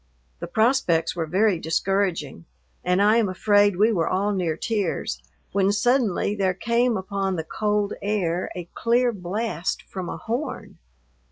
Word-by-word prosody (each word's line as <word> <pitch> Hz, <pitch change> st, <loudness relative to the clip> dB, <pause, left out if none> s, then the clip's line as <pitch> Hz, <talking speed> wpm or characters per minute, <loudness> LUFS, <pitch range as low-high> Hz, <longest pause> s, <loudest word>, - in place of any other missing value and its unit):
The -, -, -5 dB
prospects 180 Hz, -6 st, +2 dB
were 165 Hz, -2 st, -2 dB
very 190 Hz, +2 st, +2 dB
discouraging, 170 Hz, -3 st, -1 dB, 0.4 s
and 180 Hz, +2 st, +2 dB
I 215 Hz, +2 st, +5 dB
am 220 Hz, -4 st, +2 dB
afraid 205 Hz, +1 st, +3 dB
we 215 Hz, +5 st, +4 dB
were 170 Hz, -6 st, 0 dB
all 200 Hz, +3 st, 0 dB
near 170 Hz, -5 st, -1 dB
tears, 190 Hz, -, -2 dB, 0.3 s
when 195 Hz, 0 st, +2 dB
suddenly 210 Hz, -2 st, +1 dB
there 190 Hz, -3 st, 0 dB
came 235 Hz, +3 st, +1 dB
upon 195 Hz, 0 st, -2 dB
the 160 Hz, -, -3 dB
cold 210 Hz, +4 st, -1 dB
air 185 Hz, -4 st, -1 dB
a 175 Hz, -2 st, -6 dB
clear 240 Hz, +1 st, +2 dB
blast 185 Hz, -2 st, -3 dB
from 185 Hz, -2 st, -6 dB
a -, -, -5 dB
horn. 240 Hz, +7 st, -5 dB
200 Hz, 150 wpm, -24 LUFS, 180-220 Hz, 0.4 s, I